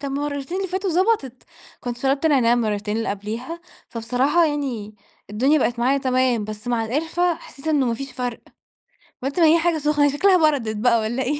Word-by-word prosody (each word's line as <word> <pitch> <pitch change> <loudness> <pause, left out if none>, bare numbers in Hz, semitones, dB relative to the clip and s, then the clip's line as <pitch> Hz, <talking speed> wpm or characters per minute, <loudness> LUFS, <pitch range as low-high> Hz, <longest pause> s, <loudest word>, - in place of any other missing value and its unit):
طَب - - -8
المرّتين 285 +3 -3
اللي 390 0 -2
فاتوا 375 +1 -2
ضبَطِت، 345 - 0 0.4
كنت 245 -1 -5
شرَبت 275 +4 +1
نعناع 260 -6 +4
المرّتين 215 -3 -1
اللي 225 - -2
قبليها، 225 +11 -5 0.3
فبصراحة 250 +9 +1
يعني 260 -8 -3 0.4
الدنيا 265 +9 +2
بقت 240 -3 0
معايا 265 +4 +2
تمام، 255 -4 +1
بس 215 +3 -7
مع 235 -2 0
القِرفة، 325 +8 0
حسّيت 305 -2 -14
إنه 290 -4 +2
ما 235 - 0
فيش 275 +3 -7
فرْق، 245 -2 -4 0.8
قلْت 280 +6 -2
ما 330 - +6
هي 325 +2 +5
حاجة 340 -1 +1
سخنة، 295 -1 +2
هي 290 - +4
شكلها 370 +6 +4
بردَت 230 -7 -2
بقى 235 +1 +3
والّا 235 +4 -2
إيه؟ 290 +3 -1
270 Hz, 190 wpm, -22 LUFS, 235-305 Hz, 0.8 s, ما